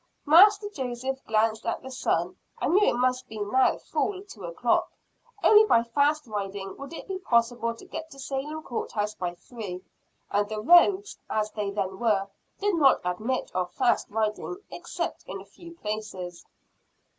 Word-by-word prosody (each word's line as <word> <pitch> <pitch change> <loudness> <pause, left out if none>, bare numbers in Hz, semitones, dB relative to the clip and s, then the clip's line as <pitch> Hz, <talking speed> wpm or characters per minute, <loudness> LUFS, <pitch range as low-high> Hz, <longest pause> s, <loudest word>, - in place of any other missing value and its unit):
Master 405 +7 +7
Joseph 265 -6 -4
glanced 220 0 +1
at 230 - -2
the 265 - -8
sun, 255 - 0 0.2
and - - +1
knew 410 +2 +5
it - - 0
must 255 0 +1
be 220 - -9
now 210 +6 +2
full 385 -1 -2
two 220 - -10
o'clock. 170 +8 +1 0.5
Only 430 0 +8
by 235 - +4
fast 285 +6 +1
riding, 200 -3 -5
would 275 +1 -8
it 330 - -8
be 380 -1 -4
possible 235 -6 +1
to - - -13
get 320 0 -7
to 275 - -13
Salem 280 +3 -4
court 240 - -4
house 210 0 -1
by 175 -3 -4
three; 185 -3 -8 0.5
and 205 0 +1
the 215 -1 -3
roads, 375 - +5
as 215 0 -1
they 210 -2 -3
then 195 -2 -3
were, 210 -4 +2 0.3
did 410 0 +1
not 275 -4 +5
admit 215 +9 -2
of 180 -1 -1
fast 250 -2 +2
riding 215 - -2
except - - -4
in - - -5
a - - -12
few 340 -1 -13
places. 210 - -6
235 Hz, 170 wpm, -27 LUFS, 210-305 Hz, 0.5 s, Only